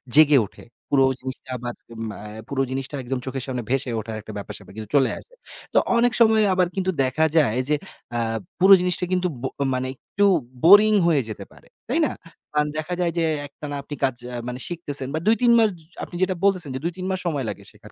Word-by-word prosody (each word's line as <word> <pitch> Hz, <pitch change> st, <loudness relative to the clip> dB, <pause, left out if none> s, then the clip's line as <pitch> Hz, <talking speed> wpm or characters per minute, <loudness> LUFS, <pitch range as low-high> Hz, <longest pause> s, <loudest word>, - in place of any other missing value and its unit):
জেগে 150 Hz, -1 st, +7 dB
ওঠে। -, -, -15 dB, 0.3 s
পুরো 135 Hz, -1 st, +4 dB, 0.2 s
জিনিসটা 130 Hz, +1 st, -8 dB
এম 120 Hz, -, -14 dB
আ -, -, -2 dB, 0.8 s
পুরো 135 Hz, -1 st, 0 dB
জিনিসটা 135 Hz, +2 st, -3 dB
একদম 130 Hz, +1 st, -3 dB
চোখের 130 Hz, -1 st, -4 dB
সামনে 125 Hz, -3 st, -3 dB
ভেসে 130 Hz, -1 st, 0 dB
ওঠার 110 Hz, +1 st, -6 dB
একটা 110 Hz, 0 st, -10 dB
ব্যাপার-স্যাপার 100 Hz, -2 st, -8 dB
কিন্তু 110 Hz, -1 st, -7 dB
চলে 135 Hz, -2 st, +4 dB
আসে। -, -, -18 dB, 0.4 s
তো -, -, +3 dB, 0.2 s
অনেক 245 Hz, +1 st, +4 dB
সময় 220 Hz, -1 st, +6 dB
আবার 180 Hz, -1 st, +3 dB
কিন্তু 190 Hz, -1 st, 0 dB
দেখা 130 Hz, +5 st, +2 dB
যায়, 130 Hz, -7 st, +3 dB
যে 150 Hz, -, +4 dB, 0.4 s
আ -, -, +1 dB, 0.4 s
পুরো 190 Hz, +2 st, +8 dB
জিনিসটা 180 Hz, 0 st, 0 dB
কিন্তু 180 Hz, 0 st, +1 dB
ব -, -, -12 dB, 0.3 s
মানে 130 Hz, 0 st, -1 dB
একটু 205 Hz, +9 st, -1 dB, 0.4 s
বোরিং 205 Hz, +5 st, +8 dB
হয়ে 155 Hz, -5 st, +3 dB
যেতে 110 Hz, -, -7 dB
পারে। -, -, -19 dB, 0.2 s
তাই -, -, +1 dB
না? -, -, -1 dB, 0.4 s
কারণ 150 Hz, 0 st, +2 dB
দেখা 155 Hz, +3 st, -3 dB
যায় 175 Hz, -1 st, +1 dB
যে 170 Hz, -, +2 dB, 0.2 s
একটানা 145 Hz, +1 st, -7 dB
আপনি 145 Hz, +1 st, -7 dB
কাজ 130 Hz, -2 st, +2 dB, 0.2 s
আ -, -, -4 dB
মানে 125 Hz, 0 st, -5 dB
শিখতেছেন 150 Hz, -6 st, -3 dB
বা 160 Hz, -, 0 dB
২ 225 Hz, -, +6 dB
৩ 240 Hz, -1 st, +5 dB
মাস 220 Hz, -1 st, +5 dB
জ -, -, -12 dB, 0.2 s
আপনি -, -, -8 dB
যেটা 185 Hz, 0 st, +2 dB
বলতেছেন 185 Hz, -6 st, +2 dB
যে, -, -, -2 dB
"২ 170 Hz, -, 0 dB
৩ 185 Hz, -, -5 dB
মাস 185 Hz, -, -1 dB
সময় 145 Hz, -7 st, -1 dB
লাগে -, -, -7 dB
শেখার -, -, -16 dB
150 Hz, 215 wpm, -23 LUFS, 130-185 Hz, 0.8 s, পুরো